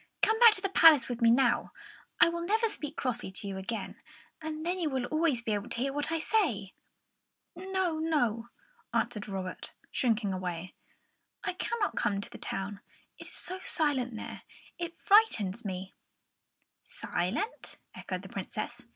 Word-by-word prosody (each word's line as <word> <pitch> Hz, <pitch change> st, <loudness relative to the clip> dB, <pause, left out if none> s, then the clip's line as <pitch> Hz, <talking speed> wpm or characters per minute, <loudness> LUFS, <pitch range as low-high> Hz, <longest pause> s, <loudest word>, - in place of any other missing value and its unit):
"Come 445 Hz, 0 st, +4 dB
back 470 Hz, -2 st, +9 dB
to 380 Hz, -, -2 dB
the 390 Hz, -, 0 dB
palace 320 Hz, -8 st, +7 dB
with 245 Hz, -1 st, -4 dB
me 230 Hz, -, +6 dB
now; 245 Hz, +1 st, +3 dB, 0.5 s
I -, -, +8 dB
will 340 Hz, 0 st, -3 dB
never 440 Hz, +6 st, +2 dB
speak 295 Hz, -7 st, -5 dB
crossly 245 Hz, -6 st, -2 dB
to 200 Hz, -, -5 dB
you 195 Hz, -1 st, -4 dB
again, 220 Hz, +4 st, -5 dB, 0.4 s
and 315 Hz, 0 st, -5 dB
then 360 Hz, +2 st, 0 dB
you 325 Hz, -3 st, +1 dB
will 260 Hz, -3 st, -1 dB
always 310 Hz, -5 st, +1 dB
be 220 Hz, -, 0 dB
able 205 Hz, -1 st, -3 dB
to -, -, -4 dB
hear 270 Hz, +3 st, 0 dB
what 290 Hz, +2 st, -2 dB
I 330 Hz, -, +1 dB
say." 300 Hz, -, 0 dB, 0.8 s
"No, 370 Hz, -2 st, -1 dB
no," 245 Hz, -8 st, +1 dB, 0.5 s
answered 225 Hz, -2 st, 0 dB
Robert, 190 Hz, -2 st, -5 dB, 0.2 s
shrinking 225 Hz, -5 st, +1 dB
back. 180 Hz, 0 st, -4 dB, 0.7 s
"I -, -, -1 dB
cannot 420 Hz, +3 st, -1 dB
come 200 Hz, -1 st, +1 dB
to 200 Hz, -, -7 dB
the -, -, -10 dB
town; 195 Hz, +1 st, -4 dB, 0.4 s
it -, -, -7 dB
is -, -, -11 dB
so 370 Hz, +1 st, -3 dB
silent 265 Hz, -9 st, +1 dB
there, -, -, -7 dB, 0.4 s
it 340 Hz, -1 st, -4 dB
frightens 240 Hz, -, +4 dB
me." 190 Hz, -2 st, -5 dB, 0.9 s
"Silent?" 195 Hz, -, -3 dB, 0.2 s
echoed -, -, -5 dB
the -, -, -10 dB
Princess. -, -, -5 dB
265 Hz, 165 wpm, -30 LUFS, 210-340 Hz, 0.9 s, back